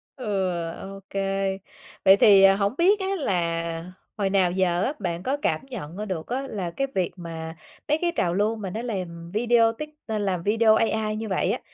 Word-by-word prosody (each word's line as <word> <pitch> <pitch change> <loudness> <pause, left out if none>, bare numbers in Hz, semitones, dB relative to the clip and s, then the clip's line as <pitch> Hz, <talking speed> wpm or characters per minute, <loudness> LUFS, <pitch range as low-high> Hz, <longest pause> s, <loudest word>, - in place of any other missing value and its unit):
Ừ, 205 -7 -1 0.3
OK. 195 0 -10 0.9
Vậy 195 +1 +8
thì, 200 -2 +7
à, 195 0 +7
hổng 200 +2 0
biết 390 +5 +4
á 380 - -2
là 170 - -2 0.3
hồi 195 -2 0
nào 190 -3 +3
giờ 180 -1 +1
á 275 - 0
bạn 175 -2 -3
có 275 +3 0
cảm 280 - 0
nhận 190 - -7
ra 210 - -3
được 180 -6 -4
á 265 +3 -3
là 185 -8 -4
cái 275 +6 -2
việc 185 -2 0
mà 165 -2 -7 0.3
mấy 300 - +2
cái 345 - +1
trào 170 - +1
lưu 210 +4 +1
mà 205 -4 -5
nó 220 +5 -4
làm 175 -7 -5
video 230 +1 +4
tít 300 +6 -7 0.2
à, 220 -1 -1
làm 185 -4 -1
video 220 +1 +4
AI 220 -1 0
như 220 +1 -4
vậy 190 - +1
á, - - -2
200 Hz, 205 wpm, -25 LUFS, 180-225 Hz, 0.9 s, Vậy